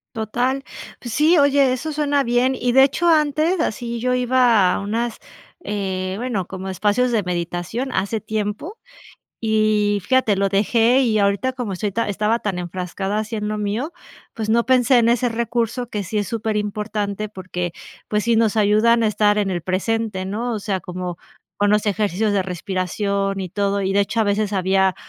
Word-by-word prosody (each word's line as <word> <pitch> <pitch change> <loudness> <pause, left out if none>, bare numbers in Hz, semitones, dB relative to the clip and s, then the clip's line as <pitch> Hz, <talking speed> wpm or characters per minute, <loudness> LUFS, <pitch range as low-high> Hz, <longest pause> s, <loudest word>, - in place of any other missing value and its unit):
Total. 245 +5 -1 0.4
Pues 240 -3 -7
sí, 310 +5 +4
oye, 280 -2 +4
eso 285 +5 -3
suena 290 -1 +1
bien. 245 +2 +2
Y 245 -1 0
de 265 +2 +6
hecho, 340 +5 +1
antes 310 +2 +2
así 235 -5 -2
yo 250 +2 +1
iba 245 -6 +3
a - - -1
unas, 225 +3 -2 0.4
eh, 190 -2 -3
bueno, 220 -6 -2
como 190 0 -6
espacios 210 +6 +1
de 225 -3 +2
meditación 175 +7 -3
hace 200 +2 -1
tiempo 215 - -4 0.6
y 215 -2 +2
fíjate, 255 0 +2
lo 195 0 +2
dejé 225 +6 +3
y 225 -4 +2
ahorita 200 +6 +1
como 245 -6 -4
estoy 200 +2 -2
ta 230 +4 -1
estaba 210 +3 +1
tan 195 -5 -3
enfrascada 185 +3 -3
así 215 +1 -4
en 210 -1 -3
lo 215 0 -2
mío, 210 +9 -2 0.4
pues, 220 -1 -4
no 235 +1 +3
pensé 255 0 +4
en 230 0 +3
ese 245 +1 +2
recurso 235 +1 -2
que 210 -3 -3
sí 205 +4 -3
es 205 - -2
superimportante 210 -1 -2
porque, 180 -3 -5 0.3
pues, 210 -1 0
sí, 235 +1 +2
nos 225 -1 +2
ayudan 220 +2 +4
a - - +3
estar 210 0 +2
en 200 -2 0
el 175 -2 -2
presente, 195 +1 -1
¿no? 225 +5 -3
O 215 - -3
sea, 195 -2 -2
como 180 0 -6 0.4
con 205 0 +2
los 210 0 +2
ejercicios 205 0 0
de 200 - +2
respiración 195 +2 -2
y 185 - -5
todo. 200 +1 0
Y 190 0 0
de 200 - +3
hecho, 215 +3 -2
a - - +3
veces 205 0 0
había 190 0 +2
215 Hz, 185 wpm, -21 LUFS, 195-240 Hz, 0.6 s, de